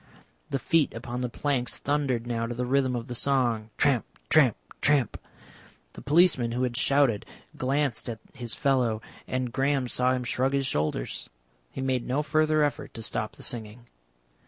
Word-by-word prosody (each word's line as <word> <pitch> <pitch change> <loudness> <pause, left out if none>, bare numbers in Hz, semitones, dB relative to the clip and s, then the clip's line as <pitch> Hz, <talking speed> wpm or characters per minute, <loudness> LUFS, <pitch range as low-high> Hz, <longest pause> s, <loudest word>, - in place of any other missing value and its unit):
The - - 0
feet 150 +2 +1
upon 120 +2 -5
the 125 - -1
planks 125 -1 -1
thundered 140 -5 0
now 115 -1 -2
to 120 - -4
the 125 +1 -2
rhythm 130 0 +1
of 115 -1 -3
the 125 - -6
song, 120 -4 +1
tramp, 135 -5 +3 0.3
tramp, 135 -8 +5 0.2
tramp. 145 -4 +3 0.8
The - - -10
policeman 145 -6 +4
who 125 +1 0
had 125 -2 -1
shouted 135 -6 +3 0.3
glanced 135 -2 0
at 115 - -4 0.2
his 120 -2 -3
fellow, 130 -6 +1 0.3
and 130 -2 -2
Graham 135 -1 +1
saw 125 +1 +2
him 125 -1 -1
shrug 130 +3 0
his 140 -1 +1
shoulders. 75 - -2 0.4
He - - -6
made 130 -2 -1
no 135 +4 0
further 155 0 +2
effort 145 - -2
to 115 - -6
stop 110 0 -2
the - - -11
singing. 115 0 -2
125 Hz, 170 wpm, -27 LUFS, 120-140 Hz, 0.8 s, tramp